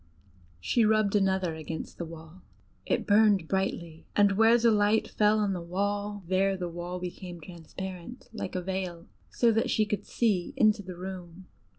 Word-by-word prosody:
She 230 - +2
rubbed 215 -1 +3
another 190 -4 +1
against 160 0 -7
the 170 - -3
wall: 165 +2 -12 0.5
it - - 0
burned 205 -4 +4
brightly, 170 -4 -3
and 205 -1 +5
where 225 +4 +5
the 235 -1 +4
light 210 +1 +2
fell 210 0 +2
on 205 -2 +1
the 180 - -4
wall, 205 +3 -2
there 190 +1 +2
the 180 -1 -4
wall 175 +1 -5
became 180 0 -7
transparent 180 +6 -9
like 190 - -5
a 180 - -2
veil, 185 -2 -4 0.2
so 235 -1 +3
that 225 +1 +1
she 215 - +2
could 210 0 -3
see 205 -7 0
into 215 -2 +4
the 185 -2 -8
room. 185 -1 -8
190 Hz, 170 wpm, -28 LUFS, 175-210 Hz, 0.5 s, and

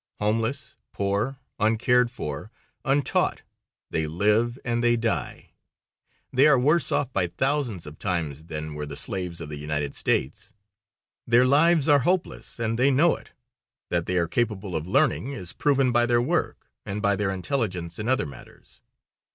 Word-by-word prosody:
Homeless, 115 +6 -1 0.2
poor, 100 +7 -1 0.2
uncared 120 +3 +3
for, 75 - -6 0.3
untaught, 140 +1 +1 0.5
they 80 -1 0
live 105 +8 +1
and 120 -1 0
they 120 0 +4
die. 115 - -2 0.8
They 135 +4 +6
are 145 -3 +6
worse 150 +5 +3
off 135 -3 0
by 90 -2 +1
thousands 120 - -1
of 75 +1 -11
times 80 -6 -2
than 75 -2 -5
were 75 0 -5
the 70 0 -7
slaves 90 -3 -4
of 75 - -7
the 75 -1 -6
United 75 -1 -2
States. 65 - -1 0.7
Their 120 +2 +5
lives 155 +3 +4
are 145 -2 +6
hopeless, 175 +7 -1
and 115 0 -1
they 135 +2 +5
know 150 +5 +4
it. - - -15 0.6
That 85 -1 -1
they 90 - 0
are 85 -1 +2
capable 100 -1 -2
of 80 +1 -3
learning 140 +3 +1
is 90 -10 -6
proven 135 -3 +2
by 120 0 +3
their 120 0 +3
work, 160 +8 -2
and 100 +1 -4
by 100 -1 +2
their 100 0 -1
intelligence 95 -4 -2
in 110 +3 -2
other 130 -9 +2
matters. 70 - -14
110 Hz, 160 wpm, -25 LUFS, 85-130 Hz, 0.8 s, They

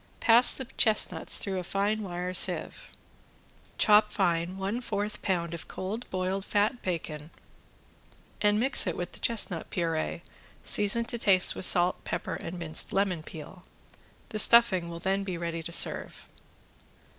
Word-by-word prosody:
Pass 235 +2 +5
the 265 - -6
chestnuts 215 -2 +2
through 190 -2 -2
a - - -5
fine 200 +4 -1
wire 180 -2 -5
sieve. - - -1 0.9
Chop 210 0 +4
fine 175 -2 0
one 200 +5 -3
fourth 210 -3 -4
pound 170 -4 -2
of 170 - -7
cold 215 +6 -6
boiled 185 +1 -2
fat 210 +5 0
bacon 155 -4 -5 1.1
and 210 0 +3
mix 255 -3 +3
it 175 - -2
with 175 0 -5
the - - -10
chestnut 205 -7 -1
puree, 165 -1 -2 0.4
season 210 +3 +2
to 235 0 -3
taste 190 -4 +4
with - - -2
salt, 180 0 +2
pepper - - -4
and 175 +2 -6
minced 160 -2 -1
lemon 195 -4 0
peel. 160 +3 -11 0.7
The 215 - -3
stuffing 210 -8 +5
will 170 - -7
then 195 +2 -1
be 185 -3 -4
ready 170 -1 -4
to 170 - -8
serve. - - -3
190 Hz, 150 wpm, -28 LUFS, 170-210 Hz, 1.1 s, Pass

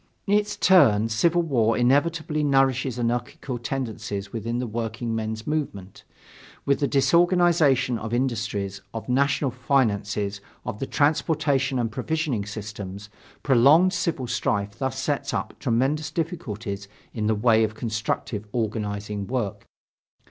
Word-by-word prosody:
In 200 - 0
its 210 0 +1
turn, 115 - +5
civil 170 +10 +2
war 115 -8 +2
inevitably 150 +4 +1
nourishes 135 -3 +2
anarchical 120 +1 -2
tendencies 110 -5 -4
within 115 +1 -3
the 125 - -1
workingmen's 110 -1 -3
movement. 120 -12 -4 0.6
With 140 -1 +2
the 140 - +1
disorganization 150 -4 +3
of 110 - -5
industries, 115 -6 -2
of 115 - -5
national 140 +1 +1
finances, 105 -6 0 0.2
of 105 - -5
the 135 - -3
transportation 145 -3 +1
and 115 -2 -1
provisioning 145 -6 -2
systems, 105 -1 -7 0.3
prolonged 145 +8 +5
civil 170 -8 -1
strife 100 -3 -1
thus 130 -1 -2
sets 140 +2 -1
up - - -3
tremendous 135 +5 0
difficulties 115 - -4 0.3
in 110 -2 -1
the 110 - +2
way 110 +1 +4
of 110 0 -1
constructive 110 -1 -3
organizing 105 -3 -3
work. 120 -6 -3
120 Hz, 125 wpm, -25 LUFS, 110-140 Hz, 0.6 s, turn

